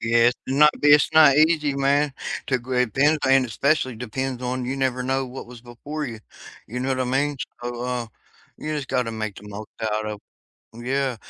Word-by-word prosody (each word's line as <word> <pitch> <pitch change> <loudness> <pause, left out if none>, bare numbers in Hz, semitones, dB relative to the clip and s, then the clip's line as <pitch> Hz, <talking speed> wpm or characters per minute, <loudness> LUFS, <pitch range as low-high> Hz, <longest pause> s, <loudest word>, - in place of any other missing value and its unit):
Yes, 115 +1 +4
to 130 - -2
not 150 +2 +7
be 150 - +3
it's 150 +1 +6
not 155 -3 +7
easy, 155 -2 +3
man, 140 +1 +2 0.3
to 130 - +1
great 125 -2 -1
bends 150 +3 +3
and 135 -1 +5
especially 130 +1 0
depends 125 +2 -4
on 125 0 -2
you 130 +2 -3
never 130 -2 0
know 130 +1 -1
what 125 0 -8
was 120 -2 -11
before 140 +6 -6
you, 115 -3 -8 0.5
you 125 +3 -5
know 130 +1 -1
what 130 -1 0
I - - +1
mean? 140 +3 0 0.3
So, 120 0 -4
uh, 125 -1 -2 0.5
you 155 0 -4
just 145 -3 -4
gotta 125 -3 0
make 110 -2 -4
the 105 - -11
most 105 +1 -8
out 110 0 -1
of 105 -1 -5 0.5
yeah, 130 +1 -1
130 Hz, 200 wpm, -23 LUFS, 120-140 Hz, 0.5 s, not